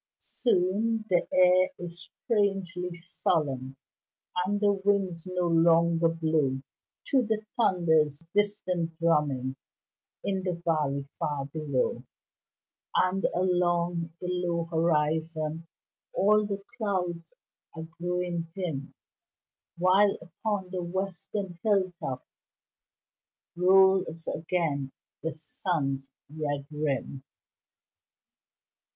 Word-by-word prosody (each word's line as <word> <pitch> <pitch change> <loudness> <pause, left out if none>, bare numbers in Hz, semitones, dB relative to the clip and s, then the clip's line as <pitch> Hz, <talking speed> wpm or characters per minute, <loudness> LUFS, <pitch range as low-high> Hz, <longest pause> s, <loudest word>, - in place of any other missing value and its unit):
Soon 220 +1 0
the 175 - +3
air 185 0 +5
is 175 -1 -9
strangely 190 -5 0
solemn 145 -6 -1 0.7
And 205 +2 0
the 205 -1 +4
winds 195 -3 0
no 180 -1 0
longer 165 0 +4
blow 155 -5 +1 0.5
To 270 - +5
the 220 -2 -1
thunder's 160 - +2
distant 185 -5 0
drumming 145 -6 +1 0.7
In 195 -1 -1
the 180 -2 -2
valley 145 -4 0
far 145 -2 -1
below; 145 -2 -1 0.9
And 185 +1 +2
along 175 -2 +1
the 180 - -5
low 175 -2 0
horizon 160 0 0 0.5
All 210 +2 +4
the 200 -1 -4 0.2
clouds 180 -6 -2 0.4
are 160 - -5 0.2
growing 175 -1 -2
dim, 160 -8 -4 0.8
While 190 +3 +4
upon 190 +2 -4
the 185 -1 -2
western 190 0 -4
hilltops 185 -10 0 1.3
Rolls 185 -2 +4
again 155 -5 -1 0.3
the 160 -1 -3
sun's 145 -4 -2 0.2
red 145 -2 -3
rim. 140 -3 -2
175 Hz, 90 wpm, -28 LUFS, 160-190 Hz, 1.3 s, air